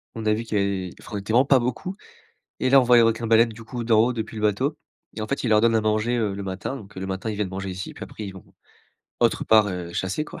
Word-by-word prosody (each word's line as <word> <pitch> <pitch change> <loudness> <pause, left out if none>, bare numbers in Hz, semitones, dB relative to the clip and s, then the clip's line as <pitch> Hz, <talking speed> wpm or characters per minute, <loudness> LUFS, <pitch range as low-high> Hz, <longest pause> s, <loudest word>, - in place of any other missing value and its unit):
On 110 -1 -5
a 110 - +3
vu 110 +2 -2
qu'il 110 -2 -2
avait 100 -2 -1
enfin, - - -9
on - - -1
était 100 +2 -5
vraiment 125 +3 +5
pas 135 -1 +5
beaucoup. 125 +10 -3 0.6
Et - - +1
là, 135 0 +8
on - - +2
voit 125 0 +6
un 120 - +7
requin-baleine 115 0 +3
du 115 +1 -11
coup, 120 +1 -5
d'en 110 -2 +4
haut, 125 - 0
depuis 110 -1 -5
le 105 - -5
bateau. 130 +9 +1 0.4
Et - - -4
en 110 - -4
fait, 140 - -2
ils - - +1
leur 105 -1 +5
donnent 115 0 +3
à - - +3
manger, 110 +3 +1
heu, 105 -4 0
le 100 - -5
matin. 95 +8 -4
Donc 105 -4 -13
le 95 +1 -4
matin, 95 +3 -3
ils 105 - -4
viennent 105 -2 -1
manger 95 +1 -5
ici, 95 +1 -6
puis - - -11
après 105 - -7
ils 95 - -7
vont 95 - -12 0.8
autre - - +2
part, 110 -2 +5
heu, 90 -2 -5
chasser, 95 - -2
quoi. - - -10
110 Hz, 295 wpm, -24 LUFS, 100-120 Hz, 0.8 s, là